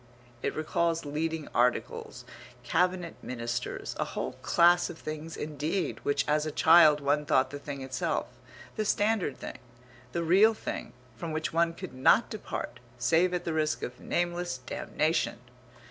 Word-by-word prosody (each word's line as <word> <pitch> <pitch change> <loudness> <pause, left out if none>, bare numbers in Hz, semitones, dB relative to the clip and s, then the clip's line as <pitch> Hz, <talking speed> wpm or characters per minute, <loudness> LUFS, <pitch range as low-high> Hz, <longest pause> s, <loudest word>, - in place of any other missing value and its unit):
It - - -2
recalls 165 +1 0
leading 155 +1 -2
articles, 125 +1 0 0.4
cabinet 180 -1 0
ministers 120 0 -4
a - - +2
whole - - -4
class 175 +1 +4
of 160 - -8
things 155 +1 -6
indeed 155 +4 -2
which 140 0 0
as 150 0 +2
a - - -2
child 150 -1 +6
one 145 +1 +1
thought 135 -3 +2
the 145 - -6
thing 140 -1 -6
itself, 130 0 -1 0.5
the 215 - +1
standard 205 -6 +1
thing, - - -8 0.5
the 170 - -1
real 200 +7 +5
thing, - - -5 0.2
from 165 +7 -5
which 155 0 -2
one 165 0 +2
could 130 - -8
not 130 - +4
depart 125 - -5 0.2
save 160 +10 +3
at 180 -1 -2
the 165 - -1
risk 155 -1 0
of 125 - -5
nameless 175 -4 -1
damnation. 160 +4 -1
155 Hz, 150 wpm, -29 LUFS, 145-175 Hz, 0.5 s, child